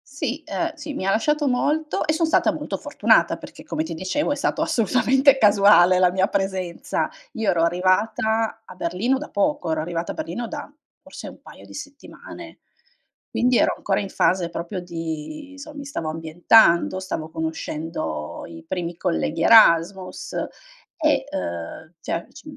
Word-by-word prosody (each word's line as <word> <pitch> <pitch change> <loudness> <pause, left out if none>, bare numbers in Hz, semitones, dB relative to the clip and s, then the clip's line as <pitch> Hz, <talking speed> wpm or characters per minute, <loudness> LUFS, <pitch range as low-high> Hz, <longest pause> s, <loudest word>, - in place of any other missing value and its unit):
Sì, 295 +1 -3
ehm, 335 -2 -2
sì 300 -1 -7
mi 190 - -4
lasciato 290 +9 +1
molto, 300 +5 0
e 310 - +1
son 320 +1 +1
stata 320 - +3
molto - - -4
fortunata - - +2
perché - - -12
come 315 - -3
ti 315 - -6
dicevo 190 - -1
è - - +1
stato 285 - -1
assolutamente 260 +5 +3
casuale 200 -4 +6
la 180 -1 +4
mia 190 +1 +2
presenza. 190 -4 -2 0.2
Io 225 -5 -1
ero 165 -2 +2
arrivata 220 +6 +1
a 185 - -13
Berlino 185 +10 0
da 300 - -7
poco, 205 - 0
ero 160 -1 0
arrivata 170 +1 -3
a - - -6
Berlino, 245 -6 -4
da 290 +1 -7 0.3
forse - - -9
un - - -15
paio - - -14
di - - -14
settimane, 285 -1 -10 0.7
quindi 250 0 +2
ero - - +3
ancora 195 - -1
in 195 - -5
fase 180 -3 +1
proprio 170 +3 -5
di 170 - -6
inso 285 +2 -10
mi 285 - -7
stavo 165 - -4
ambientando, 170 +3 +4
stavo 160 -4 -5
conoscendo 160 - -4
i 80 -1 -11
primi 175 -2 -3
colleghi 165 -2 -1
Erasmus, 185 -2 +4 0.6
e, 300 -5 +1
uhm, 85 - -5
cioè 170 - -3
c 300 - -14
195 Hz, 160 wpm, -23 LUFS, 170-275 Hz, 0.7 s, casuale